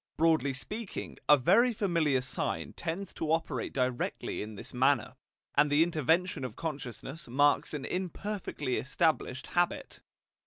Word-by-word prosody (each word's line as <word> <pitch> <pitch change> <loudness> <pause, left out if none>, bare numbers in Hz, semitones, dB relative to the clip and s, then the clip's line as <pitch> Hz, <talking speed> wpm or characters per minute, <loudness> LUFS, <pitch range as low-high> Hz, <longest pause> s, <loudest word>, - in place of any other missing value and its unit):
Broadly 160 -4 +3
speaking, 210 - -5
a 150 - +9
very 215 - +4
familiar 165 - +1
sign 125 - -3
tends 175 +3 -4
to 155 - -2
operate 160 -6 -1
directly 125 -2 -1
in 105 0 -6
this - - -9
manner, 130 -1 +2 0.4
and 145 +1 +4
the 150 +2 +6
intervention 170 +1 +1
of 125 -4 -5
consciousness 145 0 -6
marks 145 +4 +3
an 145 - -4
imperfectly 185 -6 -3
established 140 -2 0
habit. 175 0 -1
150 Hz, 130 wpm, -31 LUFS, 130-175 Hz, 0.4 s, a